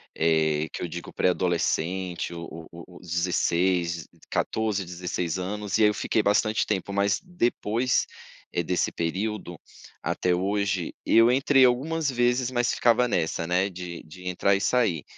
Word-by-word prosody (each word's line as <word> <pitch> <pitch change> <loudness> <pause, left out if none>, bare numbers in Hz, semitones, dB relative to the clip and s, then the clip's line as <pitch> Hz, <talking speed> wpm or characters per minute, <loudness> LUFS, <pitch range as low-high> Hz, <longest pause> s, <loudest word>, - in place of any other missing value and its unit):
eh, 80 -1 +2
que - - -6
eu 90 - -2
digo 85 +1 -7
pré-adolescente, 90 0 0
o 85 -1 -7 0.2
o 85 +1 -12
o - - -13
16, 85 0 0 0.3
14, 105 -4 0
16 90 -1 -3
anos, 100 +2 -2
e 110 - +3
aí 105 - +7
eu - - 0
fiquei 110 - 0
bastante 105 +1 +2
tempo, 100 -1 -2
mas 100 0 +2
depois, 120 - 0 0.5
eh, - - +1
desse 90 +2 0
período 95 +1 -3 0.4
até 90 -1 0
hoje, 95 -1 -1
eu 115 +2 +5
entrei 135 0 +5
algumas 145 +5 +1
vezes, 125 0 +1
mas 120 -1 +1
ficava 120 +1 +3
nessa, 85 -4 -1
né, 90 +3 +1
de 90 -2 -7
de 90 +3 -11
entrar 90 +2 +2
e 100 - -2
sair. 105 - +1
95 Hz, 150 wpm, -26 LUFS, 85-110 Hz, 0.5 s, aí